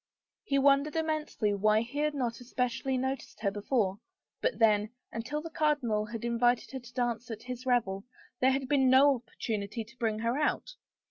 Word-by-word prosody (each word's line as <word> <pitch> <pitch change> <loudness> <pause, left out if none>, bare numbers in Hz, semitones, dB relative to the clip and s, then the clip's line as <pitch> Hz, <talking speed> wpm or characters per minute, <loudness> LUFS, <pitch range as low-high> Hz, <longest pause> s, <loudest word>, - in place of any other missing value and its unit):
He 275 - 0
wondered 280 +2 +4
immensely 310 -9 0
why 215 +2 +3
he 245 +5 -5
had 300 0 +1
not 270 - -1
more 235 - +1
espe 250 +1 -2
cially 255 +2 -2
noticed 265 +1 -4
her 200 -2 +1
before 205 -1 0 0.2
— - - -60
but - - 0
then, 210 -2 +4 0.2
until 290 +7 -4
the 330 - -7
cardinal 275 -10 +1
had 230 +1 -5
invited 240 +1 +2
her 265 - -4
to 245 -1 -14
dance 240 -1 -1
at 225 -1 -6
his 250 +1 -6
revel, 205 -6 +1 0.3
there 260 - +4
had 265 0 0
been 270 -2 +3
no 275 +2 +7
opportunity 225 -2 -4
to 235 +3 -19
bring 220 -3 0
her 230 +5 0
out. 305 +10 0
245 Hz, 195 wpm, -30 LUFS, 225-275 Hz, 0.3 s, no